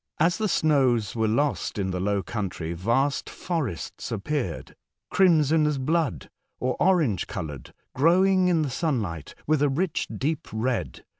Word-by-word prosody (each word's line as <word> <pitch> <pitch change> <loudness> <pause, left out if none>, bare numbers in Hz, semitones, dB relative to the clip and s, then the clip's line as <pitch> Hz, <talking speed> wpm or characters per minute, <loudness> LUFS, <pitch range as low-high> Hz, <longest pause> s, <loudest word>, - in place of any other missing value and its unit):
As 170 +5 +2
the 215 - +1
snows 130 - +2
were 110 -1 +1
lost 140 +4 0
in 95 -2 -1
the 90 - -2
low 100 +1 0
country, 90 -5 -4
vast 120 +11 0
forests 145 - -4
appeared 105 - -3 0.2
— - - -62
crimson 160 -4 +4
as 150 -2 0
blood, 135 - -1 0.3
or 130 0 0
orange 155 - +2
coloured 75 -8 -6
— - - -49
glowing 185 +6 +4
in 165 -3 +2
the 140 - -3
sunlight 110 - -2
with 155 -1 +2
a 145 - +4
rich 160 +5 -1
deep 155 +3 -2
red. 115 +3 -2
135 Hz, 155 wpm, -26 LUFS, 105-160 Hz, 0.3 s, crimson